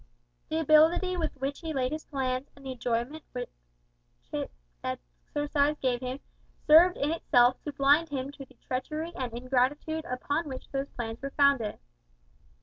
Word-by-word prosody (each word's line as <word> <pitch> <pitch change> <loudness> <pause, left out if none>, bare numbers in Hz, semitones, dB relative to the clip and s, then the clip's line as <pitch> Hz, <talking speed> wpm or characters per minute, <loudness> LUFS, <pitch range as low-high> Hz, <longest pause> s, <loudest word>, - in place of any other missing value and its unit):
The 315 +1 0
ability 320 +4 +5
with 325 -3 -1
which 275 +1 -3
he 325 -2 -4
laid 260 -2 0
his 310 0 -4
plans, 260 -2 -2
and 275 -1 -15
the 265 - -3
enjoyment 245 +4 -2
which 245 -1 -4 0.8
its - - -3 0.3
exercise 285 - -1
gave 250 -3 0
him, 255 +1 -4 0.5
served 340 +4 +7
in 290 +2 0
itself 255 -6 +3
to 295 - -4
blind 285 +4 +4
him 275 -1 -3
to 285 -1 -10
the 260 - -22
treachery 305 +6 -3
and 255 -3 -3
ingratitude 260 +6 0
upon 285 +5 -2
which 260 -1 -8
those 275 0 -2
plans 225 -1 -5
were 275 - -3
founded. 280 -7 +3
275 Hz, 155 wpm, -29 LUFS, 255-305 Hz, 0.8 s, served